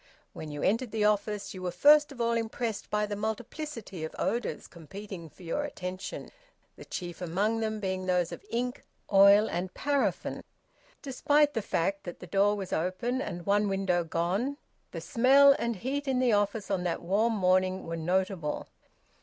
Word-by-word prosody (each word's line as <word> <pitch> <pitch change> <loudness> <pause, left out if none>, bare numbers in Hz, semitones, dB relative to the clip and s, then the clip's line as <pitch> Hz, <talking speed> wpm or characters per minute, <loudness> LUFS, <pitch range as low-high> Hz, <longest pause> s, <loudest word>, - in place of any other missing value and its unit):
When 155 - -7
you 145 -1 -5
entered 230 +5 +1
the 215 -1 0
office 210 0 0
you 185 - -8
were 180 - -2
first 295 - +5
of 270 - -11
all 235 0 +1
impressed 230 -1 -2
by 210 0 +1
the 205 0 -4
multiplicity 220 - -5
of 160 - -5
odours 235 -1 -2
competing 180 +1 -9
for 185 - -17
your 175 - -2
attention, 185 -9 -6 0.4
the - - -12
chief 175 -1 -6
among 200 +6 0
them 220 -1 -2
being 190 -2 -3
those 180 -2 +1
of - - -8
ink, 250 - -2 0.3
oil, 200 +2 +7
and 180 +2 -3
paraffin. 285 -1 -1 0.6
Despite 290 +2 +2
the 225 - -1
fact 195 +1 -1
that 175 - -7
the - - -9
door 200 +3 +2
was 195 -3 -5
open 210 +10 -1
and 175 -10 -5
one 205 +1 +2
window 190 -3 +1
gone, 185 - -1 0.3
the - - -6
smell 275 +3 +6
and 235 -1 -1
heat 275 +8 -3
in 265 -1 +1
the 250 -3 +3
office 205 0 0
on 190 -2 +1
that 175 - -2
warm 215 +6 +2
morning 185 -1 +2
were 165 - -4
notable. 175 -1 -1
205 Hz, 175 wpm, -29 LUFS, 185-235 Hz, 0.6 s, oil